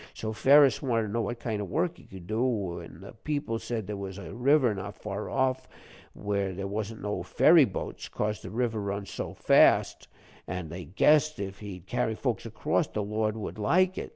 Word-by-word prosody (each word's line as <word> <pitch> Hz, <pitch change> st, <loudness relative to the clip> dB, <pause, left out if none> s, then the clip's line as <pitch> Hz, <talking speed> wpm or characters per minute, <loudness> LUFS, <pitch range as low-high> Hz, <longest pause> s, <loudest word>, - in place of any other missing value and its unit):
So 110 Hz, 0 st, -4 dB
Ferus 135 Hz, +2 st, +5 dB
wanted 115 Hz, -5 st, +1 dB
to 105 Hz, -1 st, -5 dB
know 115 Hz, -, +1 dB
what 120 Hz, +1 st, -3 dB
kind 110 Hz, -4 st, -3 dB
of 100 Hz, -, -5 dB
work 170 Hz, +1 st, 0 dB
he -, -, -16 dB
could 95 Hz, -2 st, -11 dB
do, 110 Hz, -5 st, -1 dB
an' 85 Hz, 0 st, -12 dB
the 100 Hz, -, -10 dB
people 115 Hz, -1 st, -3 dB
said 115 Hz, -3 st, -4 dB
there 105 Hz, -, -4 dB
was 100 Hz, -1 st, -6 dB
a 100 Hz, -, -8 dB
river 130 Hz, -1 st, +3 dB
not 100 Hz, 0 st, -6 dB
far 105 Hz, 0 st, -5 dB
off, 130 Hz, -1 st, 0 dB, 0.5 s
where 100 Hz, -2 st, -2 dB
there 95 Hz, +1 st, -4 dB
wasn't 105 Hz, +2 st, -4 dB
no 105 Hz, 0 st, -2 dB
ferry 160 Hz, -2 st, +5 dB
boats, 95 Hz, -, -6 dB
cos 105 Hz, 0 st, -2 dB
the -, -, -8 dB
water 115 Hz, 0 st, -1 dB
run 100 Hz, 0 st, -3 dB
so -, -, -6 dB
fast, -, -, +4 dB, 0.4 s
an' 90 Hz, -2 st, -4 dB
they 90 Hz, +2 st, -7 dB
guessed 150 Hz, -, +3 dB
if 100 Hz, -1 st, -5 dB
he'd 95 Hz, -4 st, -8 dB
carry 110 Hz, +2 st, -1 dB
folks -, -, -2 dB
across, -, -, 0 dB
the 105 Hz, -, -3 dB
Lord 110 Hz, +1 st, -1 dB
would 110 Hz, 0 st, -6 dB
like 185 Hz, -, +3 dB
it. -, -, -6 dB
105 Hz, 205 wpm, -28 LUFS, 100-125 Hz, 0.5 s, Ferus